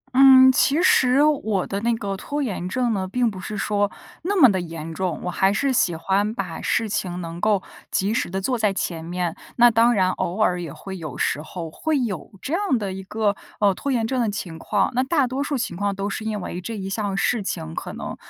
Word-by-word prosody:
嗯， 260 -1 +8
其 275 +3 +3
实 260 -3 +5
我 220 -11 +1
的 200 - -3
那 235 +2 +1
个 200 -3 -3
拖 290 +9 -3
延 185 -7 -3
症 245 +1 0
呢， 190 -2 -2
并 240 +3 +1
不 190 - -8
是 210 +3 -5
说 205 -1 0 0.3
那 390 +3 0
么 265 - +9
的 190 -2 -1
严 165 -1 -7
重， 180 -2 -2
我 180 - -2
还 190 +2 +2
是 265 +7 +1
喜 175 -8 +2
欢 200 +6 0
把 180 -4 -4
事 225 - 0
情 180 -4 -2
能 170 0 -6
够 210 -3 +2 0.3
及 200 +3 0
时 - - -1
地 190 +2 -2
做 245 +6 -1
在 215 -3 +2
前 170 -4 -3
面。 175 0 -3 0.2
那 240 0 +6
当 230 +1 +4
然 185 -2 +3
偶 180 +3 -3
尔 180 -4 +2
也 165 - -6
会 190 +4 -8
有 155 -6 -7
时 150 - 0
候， 165 0 -7
会 310 - -1
有 210 -9 -3
这 290 - -3
样 360 -8 +1
的 200 -3 -3
一 190 - -6
个， 205 +1 -1 0.2
呃， 205 -2 +4
拖 275 +8 -3
延 230 -3 +1
症 255 +1 0
的 230 - +1
情 175 -5 -5
况， 200 +1 0
那 250 - +2
大 275 +1 +2
多 260 +3 -2
数 285 -1 -2
情 185 -7 -3
况 200 +1 -1
都 195 +1 -3
是 205 +2 -4
因 215 -1 -2
为 180 0 -5
这 225 +3 -5
一 190 - -5
项 195 0 -2
事 215 +4 +1
情， 80 - -4
可 - - -5
能 - - -6
205 Hz, 255 characters per minute, -23 LUFS, 185-240 Hz, 0.3 s, 么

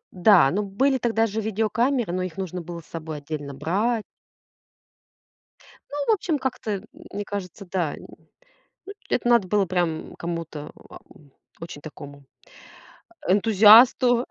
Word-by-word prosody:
Да, 180 -6 +5
ну 205 +6 -1
были 260 +7 +1
тогда 225 -1 +1
же 220 +1 -3
видеокамеры, 220 +1 0
но 185 0 -1
их 185 -1 -5
нужно 180 -2 -4
было 170 0 -8
с - - -20
собой 160 -2 -7
отдельно 145 -1 -6
брать. 210 - -1 1.8
Ну, 290 - -7
в - - +5
общем, 335 -6 -2
как-то, 250 -4 -4
э, - - 0
м, 205 +3 -11 0.3
мне 205 +1 -4
кажется, 200 -1 -6
да. 175 -6 -1
Э, - - -9 0.9
ну, 400 - -8 0.2
это - - 0
надо 235 -6 +4
было 205 0 +2
прям, 175 -2 0 0.2
м, - - -13
кому-то, 165 -3 -6 0.2
а, - - -12
о - - -18 0.6
очень 165 -3 -8
такому, 145 -2 -11 1.0
а, - - +1
энтузиасту. 225 +4 +6
195 Hz, 155 wpm, -24 LUFS, 170-225 Hz, 1.8 s, энтузиасту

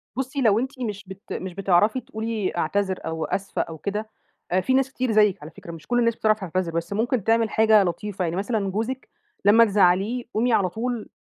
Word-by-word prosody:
بُصّي، 265 +2 -3
لو 220 -3 +4
أنتِ 260 +2 -4
مش 210 -5 -4
بت 190 +4 -9
مش 185 -1 -5
بتعرفي 195 +5 +2
تقولي 220 -6 -3
أعتذر 190 +3 0
أو 160 -1 -3
أسفة 195 0 -2
أو 165 - -6
كده، 210 +6 -4 0.4
آآ 185 +1 +3
في 260 - 0
ناس 265 0 +2
كتير 255 -2 -1
زيِّك 210 -4 +3
على 150 +2 -9
فكرة 170 - -11
مش 165 -2 -11
كل 245 0 +2
الناس 230 -1 +2
بتعرف 215 -1 +2
تعتذر، 185 -2 -2
بس 170 +3 -3
ممكن 230 +1 0
تعمل 225 +1 +2
حاجة 220 -1 +5
لطيفة. 190 +2 -3
يعني 165 0 -2
مثلًا 200 +1 -1
جوزِك 230 +6 -3 0.4
لمّا 225 +3 +7
تزعّليه، 200 +4 +2
قومي 235 +2 +1
على 190 -4 +3
طول 230 +3 -4
210 Hz, 205 wpm, -24 LUFS, 185-230 Hz, 0.4 s, لمّا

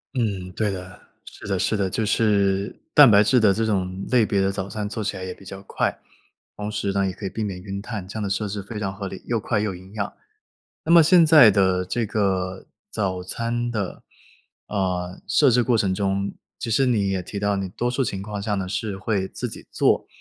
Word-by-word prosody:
嗯， 100 -7 -2
对 105 +1 0
的， 90 -1 -8 0.3
是 - - -11
的， 95 -2 0
是 110 - +1
的， 95 -2 0
就 110 +4 -1
是 100 -2 +1
蛋 145 -4 +9
白 100 0 +7
质 125 +4 +4
的 105 -3 +5
这 115 +3 0
种 95 -3 -2
类 120 -3 +4
别 100 -2 0
的 95 0 +1
早 95 0 -4
餐 105 -1 -3
做 110 +1 -4
起 105 - -3
来 95 - -6
也 95 - -5
比 - - -17
较 95 +1 -8
快。 - - -2 0.6
同 105 0 -4
时 105 -2 -1
呢， 100 0 +1
也 95 - -2
可 100 - -8
以 - - -1
避 110 - -4
免 95 -3 -4
晕 100 0 -5
碳， 105 -4 -6
这 100 - -10
样 110 - -2
的 100 - -2
设 105 +2 -1
置 100 0 -5
非 105 +2 -7
常 95 -2 -2
合 100 0 -5
理， 95 - -8
又 115 -2 0
快 105 +1 -1
又 105 -3 -2
营 95 +2 -13
养。 105 -2 -3 0.7
那 - - -3
么 170 -1 +9
现 170 +2 +6
在 155 -8 +8
的 95 -2 +2
这 115 +6 -1
个 95 -3 -1 0.2
早 95 -3 -2
餐 120 +5 -2
的， 105 -5 -4 0.6
呃， 90 -2 -2
设 145 - +4
置 125 +1 +4
过 120 -1 +2
程 100 -4 +1
中， 100 0 -1 0.3
其 - - -4
实 130 +5 +3
你 105 -6 +2
也 95 -1 -1
提 100 +3 -6
到 100 0 +1
你 95 -1 -3
多 120 +6 -2
数 125 +2 0
情 100 -6 -3
况 105 0 -5
下 105 0 -1
呢， 95 -2 -3
是 100 +1 -3
会 95 -1 -1
自 - - -5
己 - - -10
做。 - - +2
100 Hz, 250 characters per minute, -23 LUFS, 95-110 Hz, 0.7 s, 蛋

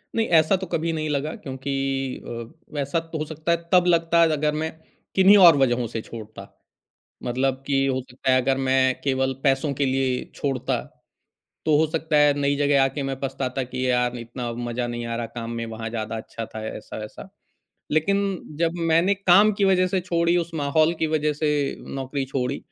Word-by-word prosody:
नहीं, 225 -1 +1
ऐसा 160 +2 +4
तो 190 -1 -6
कभी 165 0 -1
नहीं 155 -1 -2
लगा 150 +2 -2
क्योंकि 135 -1 -6 0.5
अ, 115 +4 -9
वैसा 145 +3 -1
तो 165 0 -7
हो 155 - -2
सकता 155 +2 -3
है 170 - +3 0.2
तब 180 -1 +6
लगता 170 0 +3
है 165 - +5
अगर 150 0 0
मैं 160 - -2 0.4
किन्हीं 195 +2 +7
और 170 -6 +8
वजहों 125 -3 +2
से 115 0 -5
छोड़ता। 110 -1 -10 0.7
मतलब 130 +2 -1
कि 135 -1 +2
हो 130 -1 0
सकता 130 +1 -3
है 130 - +5
अगर 135 +1 +1
मैं 130 0 +3
केवल 135 -1 0
पैसों 135 +1 +2
के 140 - 0
लिए 130 -1 0
छोड़ता, 135 -3 -1 0.8
तो 155 -1 +4
हो 155 +2 +3
सकता 160 -1 -1
है 145 0 +6
नई 140 0 +1
जगह 145 -1 +3
आके 140 +1 -2
मैं 135 -1 -3
पछताता 135 -1 -2
कि 130 +1 -3
यार 125 0 +1
इतना 120 0 -5
मज़ा 120 +1 -3
नहीं 120 0 -4
आ 115 0 -3
रहा 120 - -3
काम 115 -1 -4
में, 115 0 -3
वहाँ 115 0 -6
ज़्यादा 110 -1 -4
अच्छा 115 +1 -6
था 110 - -5
ऐसा-वैसा। 105 0 -8 0.6
लेकिन 195 +4 +1 0.2
जब 165 -1 +1 0.2
मैंने 170 +5 +4
काम 200 +2 +5
की - - +5
वजह 185 -1 +4
से 185 0 0
छोड़ी, 170 -1 +1
उस 170 -1 -1
माहौल 155 +2 +2
की 160 - +1
वजह 155 -1 0
से 150 -1 0 0.2
नौकरी 135 +1 -3
छोड़ी, 130 0 -2
140 Hz, 195 wpm, -24 LUFS, 125-160 Hz, 0.8 s, और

